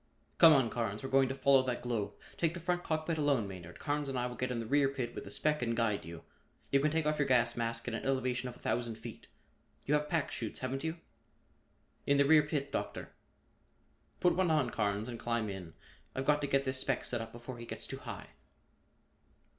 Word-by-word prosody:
"Come 165 Hz, -2 st, +10 dB
on, 130 Hz, -6 st, +3 dB
Carnes, 110 Hz, -2 st, -2 dB
we're 135 Hz, -, -4 dB
going 135 Hz, -1 st, +4 dB
to 135 Hz, -, -2 dB
follow 135 Hz, 0 st, +5 dB
that 125 Hz, -2 st, -3 dB
globe. 115 Hz, -4 st, -2 dB, 0.2 s
Take 165 Hz, 0 st, 0 dB
the -, -, -4 dB
front 175 Hz, +1 st, -1 dB
cockpit 155 Hz, 0 st, -1 dB
alone, 140 Hz, -8 st, +2 dB
Maynard; 90 Hz, -3 st, -9 dB
Carnes 145 Hz, -1 st, -2 dB
and 135 Hz, -, -2 dB
I 125 Hz, -, 0 dB
will 125 Hz, 0 st, -4 dB
get 125 Hz, 0 st, -2 dB
in 125 Hz, -2 st, -2 dB
the 115 Hz, -, -3 dB
rear 140 Hz, +3 st, +3 dB
pit 130 Hz, -4 st, -4 dB
with -, -, -6 dB
the -, -, -8 dB
spec 150 Hz, -2 st, 0 dB
and 115 Hz, -1 st, -1 dB
guide 110 Hz, -4 st, +1 dB
you. 85 Hz, 0 st, -9 dB, 0.5 s
You 140 Hz, -, +5 dB
can 150 Hz, +2 st, +2 dB
take 160 Hz, 0 st, 0 dB
off 150 Hz, 0 st, +1 dB
your 145 Hz, -, +2 dB
gas 120 Hz, -3 st, +3 dB
mask 115 Hz, 0 st, -2 dB
at -, -, -2 dB
an 115 Hz, -, -3 dB
elevation 130 Hz, -1 st, 0 dB
of 120 Hz, -, -10 dB
a -, -, -17 dB
thousand 120 Hz, -2 st, -1 dB
feet. -, -, -9 dB, 0.6 s
You 145 Hz, -, +1 dB
have 150 Hz, 0 st, +1 dB
pack 160 Hz, -3 st, 0 dB
'chutes, 110 Hz, -3 st, -4 dB
haven't 130 Hz, +2 st, -2 dB
you?" 160 Hz, +1 st, -2 dB, 1.1 s
"In 140 Hz, -, +4 dB
the 140 Hz, -, +5 dB
rear 155 Hz, +1 st, +7 dB
pit, 145 Hz, -2 st, -2 dB
Doctor." -, -, -4 dB, 1.1 s
"Put 180 Hz, -, +4 dB
one 185 Hz, -1 st, +2 dB
on, 150 Hz, -7 st, +2 dB
Carnes, 105 Hz, 0 st, -1 dB
and 120 Hz, -2 st, -6 dB
climb 115 Hz, -2 st, -1 dB
in. 90 Hz, -4 st, -7 dB, 0.4 s
I've 130 Hz, -, -2 dB
got 150 Hz, +1 st, +3 dB
to 145 Hz, -, 0 dB
get 135 Hz, 0 st, +2 dB
this 130 Hz, -1 st, -1 dB
spec 135 Hz, -1 st, 0 dB
set 120 Hz, -2 st, -2 dB
up 115 Hz, 0 st, -7 dB
before 120 Hz, +1 st, -8 dB
he 120 Hz, -, -8 dB
gets -, -, -4 dB
too -, -, -6 dB
high." -, -, -7 dB
130 Hz, 230 wpm, -33 LUFS, 115-145 Hz, 1.1 s, Come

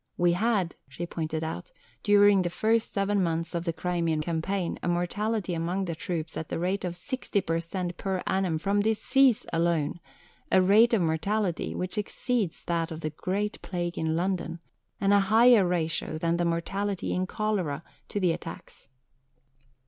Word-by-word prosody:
"We 175 Hz, 0 st, +4 dB
had," 195 Hz, -1 st, +1 dB, 0.2 s
she 170 Hz, +6 st, -5 dB
pointed 160 Hz, -2 st, -3 dB
out, 160 Hz, -, -5 dB, 0.3 s
"during 205 Hz, -2 st, +5 dB
the 175 Hz, -, -1 dB
first 220 Hz, +5 st, +1 dB
seven 200 Hz, 0 st, +1 dB
months 165 Hz, -1 st, -1 dB
of 170 Hz, 0 st, -2 dB
the 165 Hz, -, +1 dB
Crimean 165 Hz, -1 st, -1 dB
campaign, 170 Hz, +3 st, -2 dB
a -, -, -3 dB
mortality 185 Hz, +3 st, -1 dB
among 175 Hz, +4 st, -1 dB
the 170 Hz, -, -3 dB
troops 160 Hz, -1 st, -4 dB
at 160 Hz, -, -5 dB
the -, -, -2 dB
rate 185 Hz, +4 st, -1 dB
of 175 Hz, -1 st, -3 dB
60 255 Hz, +2 st, -2 dB
per 165 Hz, -2 st, -1 dB
cent 175 Hz, +1 st, -4 dB
per 190 Hz, -2 st, -2 dB
annum 190 Hz, -4 st, +1 dB
from 200 Hz, +5 st, +1 dB
disease 225 Hz, +4 st, +3 dB
alone, 165 Hz, -1 st, +1 dB, 0.5 s
a -, -, +6 dB
rate 215 Hz, +6 st, +5 dB
of 195 Hz, -, +2 dB
mortality 175 Hz, +3 st, -1 dB
which 185 Hz, +4 st, -2 dB
exceeds 210 Hz, -2 st, -2 dB
that 170 Hz, -1 st, -1 dB
of 160 Hz, -1 st, -7 dB
the 155 Hz, -, -2 dB
Great 195 Hz, +6 st, -2 dB
Plague 175 Hz, -2 st, -3 dB
in 160 Hz, 0 st, -1 dB
London, 175 Hz, -1 st, -1 dB, 0.4 s
and 195 Hz, +1 st, +3 dB
a 200 Hz, -, +6 dB
higher 220 Hz, +1 st, +6 dB
ratio 165 Hz, -2 st, -1 dB
than 170 Hz, +1 st, 0 dB
the 175 Hz, -, +1 dB
mortality 195 Hz, +4 st, -1 dB
in 185 Hz, +1 st, -1 dB
cholera 185 Hz, -9 st, -1 dB, 0.3 s
to 205 Hz, -, -2 dB
the 180 Hz, -3 st, +3 dB
attacks." 165 Hz, 0 st, -8 dB
180 Hz, 170 wpm, -28 LUFS, 165-205 Hz, 0.5 s, a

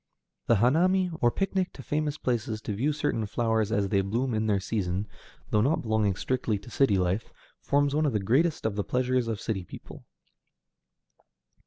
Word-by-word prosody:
The 115 Hz, -, +5 dB
hanami, 175 Hz, -, +3 dB
or 120 Hz, -, +5 dB
picnic 190 Hz, +5 st, -1 dB
to 135 Hz, -, -10 dB
famous 150 Hz, +1 st, -1 dB
places 115 Hz, -4 st, -2 dB
to 105 Hz, -, -3 dB
view 130 Hz, +9 st, 0 dB
certain 145 Hz, -7 st, -1 dB
flowers 110 Hz, 0 st, 0 dB
as 100 Hz, -4 st, +1 dB
they 100 Hz, 0 st, +2 dB
bloom 115 Hz, +6 st, -1 dB
in 110 Hz, 0 st, 0 dB
their 100 Hz, -2 st, +2 dB
season, 95 Hz, -1 st, -2 dB, 0.4 s
though 105 Hz, -, +3 dB
not 140 Hz, +8 st, +1 dB
belonging 110 Hz, -3 st, +1 dB
strictly 120 Hz, -1 st, -1 dB
to 100 Hz, +5 st, -13 dB
city 110 Hz, -8 st, +3 dB
life, 90 Hz, +3 st, -1 dB, 0.3 s
forms 145 Hz, 0 st, +1 dB
one 155 Hz, +1 st, +2 dB
of 135 Hz, -, -1 dB
the 105 Hz, -, +1 dB
greatest 135 Hz, -, +1 dB
of 110 Hz, -2 st, 0 dB
the 105 Hz, -, -1 dB
pleasures 125 Hz, 0 st, 0 dB
of 110 Hz, -3 st, -2 dB
city 100 Hz, -5 st, -3 dB
people. -, -, -11 dB
115 Hz, 180 wpm, -27 LUFS, 105-140 Hz, 0.4 s, The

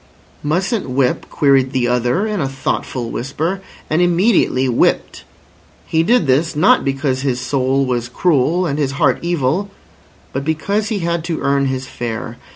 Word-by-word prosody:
"Mustn't 185 Hz, -, -1 dB
whip," 125 Hz, 0 st, 0 dB
queried 135 Hz, -3 st, +2 dB
the 125 Hz, -2 st, +1 dB
other 125 Hz, -, +1 dB
in 210 Hz, -5 st, -2 dB
a 135 Hz, -, -1 dB
thoughtful 130 Hz, -2 st, -3 dB
whisper, 160 Hz, +9 st, -3 dB, 0.3 s
and 155 Hz, +3 st, +1 dB
immediately 175 Hz, -, +2 dB
whipped. 120 Hz, -, 0 dB, 0.6 s
He 160 Hz, -, +1 dB
did 220 Hz, +2 st, +3 dB
this, 150 Hz, +5 st, +1 dB
not 150 Hz, -, +4 dB
because 135 Hz, -1 st, -1 dB
his 130 Hz, -3 st, -1 dB
soul 135 Hz, +1 st, 0 dB
was 120 Hz, -2 st, -2 dB
cruel 170 Hz, +4 st, +1 dB
and 145 Hz, -2 st, -2 dB
his 135 Hz, -2 st, 0 dB
heart 140 Hz, -2 st, +2 dB
evil, 170 Hz, +3 st, 0 dB, 0.6 s
but 135 Hz, -, -2 dB
because 200 Hz, +8 st, -1 dB
he 205 Hz, -4 st, -2 dB
had 170 Hz, -1 st, -1 dB
to 165 Hz, -2 st, -3 dB
earn 140 Hz, 0 st, +1 dB
his 130 Hz, 0 st, -3 dB
fare. 115 Hz, -2 st, -5 dB
140 Hz, 160 wpm, -18 LUFS, 130-170 Hz, 0.6 s, not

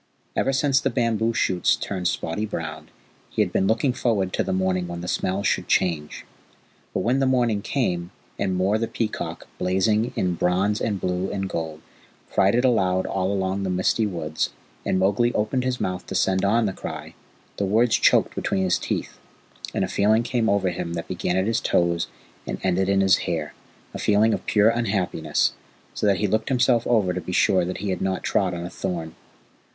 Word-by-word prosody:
Ever 135 Hz, -, +1 dB
since 135 Hz, 0 st, +3 dB
the 135 Hz, -, 0 dB
bamboo 115 Hz, -2 st, +1 dB
shoots 95 Hz, -5 st, +2 dB
turned 90 Hz, -3 st, -3 dB
spotty 90 Hz, +4 st, -2 dB
brown 80 Hz, -4 st, -6 dB, 0.4 s
he -, -, +2 dB
had -, -, -5 dB
been 95 Hz, -, +2 dB
looking 125 Hz, +5 st, +2 dB
forward 105 Hz, -7 st, 0 dB
to -, -, +1 dB
the -, -, -3 dB
morning 95 Hz, -1 st, 0 dB
when 85 Hz, 0 st, -6 dB
the 90 Hz, -, -6 dB
smells 95 Hz, +2 st, -1 dB
should -, -, +1 dB
change. 80 Hz, -5 st, 0 dB, 0.7 s
But -, -, -1 dB
when 125 Hz, +3 st, +1 dB
the 135 Hz, -, +2 dB
morning 120 Hz, -5 st, +2 dB
came, 90 Hz, -10 st, -1 dB, 0.3 s
and 95 Hz, -2 st, 0 dB
Mor 95 Hz, +4 st, +1 dB
the 115 Hz, -, -1 dB
Peacock, 110 Hz, -1 st, -4 dB
blazing 105 Hz, +6 st, +1 dB
in 90 Hz, -1 st, 0 dB
bronze 95 Hz, +5 st, +1 dB
and 105 Hz, -3 st, -1 dB
blue 90 Hz, +1 st, -1 dB
and 95 Hz, -1 st, -2 dB
gold, 80 Hz, -3 st, -4 dB, 0.5 s
cried 95 Hz, +3 st, +3 dB
it 125 Hz, +2 st, +2 dB
aloud 95 Hz, -7 st, +2 dB
all 95 Hz, 0 st, -1 dB
along 95 Hz, 0 st, -1 dB
the 95 Hz, -, -2 dB
misty 95 Hz, +4 st, +1 dB
woods, 80 Hz, -5 st, -2 dB, 0.3 s
and -, -, 0 dB
Mowgli 100 Hz, +6 st, +2 dB
opened 110 Hz, +5 st, 0 dB
his 130 Hz, -1 st, -1 dB
mouth 90 Hz, 0 st, -3 dB
to -, -, -5 dB
send 95 Hz, 0 st, +2 dB
on 110 Hz, +3 st, +3 dB
the 95 Hz, -, -1 dB
cry, -, -, -7 dB, 0.4 s
the 100 Hz, -, 0 dB
words 110 Hz, +3 st, +3 dB
choked -, -, +3 dB
between 95 Hz, -, -1 dB
his 90 Hz, -1 st, +2 dB
teeth, -, -, -4 dB, 0.5 s
and -, -, 0 dB
a -, -, -5 dB
feeling 110 Hz, +3 st, +2 dB
came 120 Hz, -2 st, 0 dB
over 100 Hz, -2 st, +2 dB
him 85 Hz, -1 st, -4 dB
that 85 Hz, -1 st, -4 dB
began 90 Hz, 0 st, -1 dB
at 95 Hz, -, +2 dB
his 115 Hz, +2 st, +1 dB
toes 85 Hz, -5 st, +1 dB, 0.4 s
and -, -, -3 dB
ended 95 Hz, +1 st, +1 dB
in 100 Hz, 0 st, +3 dB
his 95 Hz, -1 st, +5 dB
hair -, -, -2 dB, 0.4 s
a -, -, -5 dB
feeling 105 Hz, +2 st, +3 dB
of -, -, -4 dB
pure 105 Hz, +1 st, +4 dB
unhappiness, 95 Hz, -9 st, 0 dB, 0.4 s
so -, -, -1 dB
that 100 Hz, -2 st, +3 dB
he -, -, 0 dB
looked 110 Hz, +2 st, 0 dB
himself 125 Hz, -2 st, +2 dB
over 105 Hz, -7 st, +2 dB
to 90 Hz, -, -3 dB
be 90 Hz, -, -6 dB
sure 90 Hz, 0 st, +3 dB
that 90 Hz, +1 st, -3 dB
he 100 Hz, 0 st, -2 dB
had 95 Hz, -, -3 dB
not 95 Hz, -1 st, -1 dB
trod 95 Hz, -3 st, +1 dB
on 85 Hz, 0 st, -5 dB
a -, -, -5 dB
thorn. 85 Hz, -4 st, -4 dB
95 Hz, 200 wpm, -24 LUFS, 90-110 Hz, 0.7 s, his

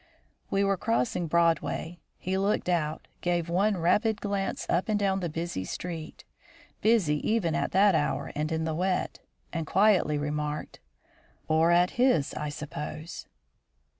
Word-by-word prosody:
We 195 Hz, 0 st, +2 dB
were 195 Hz, -1 st, +2 dB
crossing 225 Hz, -4 st, 0 dB
Broadway. 170 Hz, +1 st, +1 dB, 0.2 s
He 185 Hz, +1 st, -2 dB
looked 195 Hz, +1 st, 0 dB
out, 155 Hz, -3 st, -1 dB
gave 175 Hz, -1 st, 0 dB
one 195 Hz, +4 st, +2 dB
rapid 205 Hz, +6 st, +2 dB
glance 200 Hz, -1 st, -2 dB
up 180 Hz, +5 st, 0 dB
and 215 Hz, -, +2 dB
down 195 Hz, -1 st, +1 dB
the 175 Hz, -2 st, -2 dB
busy 165 Hz, -, -3 dB
street, 165 Hz, -, -6 dB, 0.6 s
busy 210 Hz, -10 st, +3 dB
even 185 Hz, -1 st, 0 dB
at 170 Hz, -, -1 dB
that 195 Hz, +1 st, +5 dB
hour 150 Hz, -2 st, 0 dB
and 155 Hz, +2 st, -2 dB
in 160 Hz, 0 st, 0 dB
the 160 Hz, 0 st, -1 dB
wet, 180 Hz, +3 st, -1 dB, 0.3 s
and 165 Hz, -2 st, -3 dB
quietly 195 Hz, -7 st, +3 dB
remarked: 150 Hz, 0 st, -3 dB, 0.7 s
"Or 160 Hz, +1 st, +3 dB
at 175 Hz, +4 st, +3 dB
his, 250 Hz, -, +3 dB
I 150 Hz, 0 st, -3 dB
suppose?" 150 Hz, +2 st, -6 dB
175 Hz, 145 wpm, -28 LUFS, 155-195 Hz, 0.7 s, that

